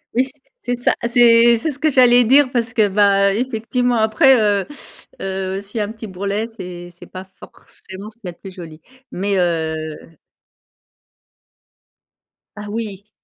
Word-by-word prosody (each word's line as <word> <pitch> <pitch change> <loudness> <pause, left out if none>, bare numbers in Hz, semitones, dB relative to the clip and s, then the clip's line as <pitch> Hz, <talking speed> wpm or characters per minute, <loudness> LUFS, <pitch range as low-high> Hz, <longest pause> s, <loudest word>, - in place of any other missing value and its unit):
Oui 255 +2 +3
c 260 - -7 0.3
c'est 245 0 -2
ça, 245 - +1
c'est 235 -1 +5
c'est 265 +8 -2
ce 275 - -7
que 310 - +2
j'allais 245 -2 +5
dire, 265 +2 +4
parce 230 -3 -1
que 215 -3 +2
ben, 200 0 +3
effectivement, 245 +2 -1
après, 220 +5 +4
heu, 205 -2 +1 0.6
heu, 190 0 -3
s'il 200 +3 -9
y - - 0
a - - 0
un 205 - -7
petit 220 0 -9
bourrelet, 200 +3 -3
c'est 180 -6 -9
c'est 175 - -14
pas 185 0 -8 0.2
forcément 190 +3 -11
ce 215 - -19
qu'il 225 -5 -11
y - - -3
a 175 - -8
de - - -29
plus 195 - -11
joli. 165 -4 -11 0.3
Mais 195 +2 -1
heu 160 -3 -2 2.6
Ah 210 0 -8
oui. 210 -2 -6
210 Hz, 170 wpm, -19 LUFS, 190-235 Hz, 2.6 s, c'est